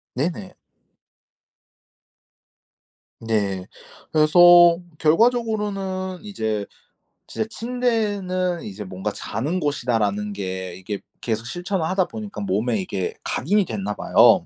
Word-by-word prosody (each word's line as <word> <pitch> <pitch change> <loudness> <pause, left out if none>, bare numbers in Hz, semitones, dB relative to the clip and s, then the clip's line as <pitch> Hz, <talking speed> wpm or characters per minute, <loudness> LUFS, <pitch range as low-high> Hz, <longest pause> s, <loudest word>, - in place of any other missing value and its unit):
네네. 175 +7 -3 2.7
네. 100 -5 -1 0.5
그래서 175 +2 +7 0.2
결과적으로는 195 -1 +1
이제 110 - -2 0.6
진짜 220 - -3
'침대는 205 -8 -1
이제 105 +1 -7
뭔가 95 +2 -4
자는 145 - -3
곳이다.'라는 110 -8 0
게 95 -2 -5
이게 95 +2 -5 0.2
계속 115 0 -2
실천을 175 +2 -2
하다 185 +2 +1
보니까 210 - -7
몸에 105 +2 0
이게 95 0 -3
각인이 205 +9 +1
됐나 105 - -3
봐요. - - +5
155 Hz, 225 characters per minute, -23 LUFS, -, 2.7 s, 그래서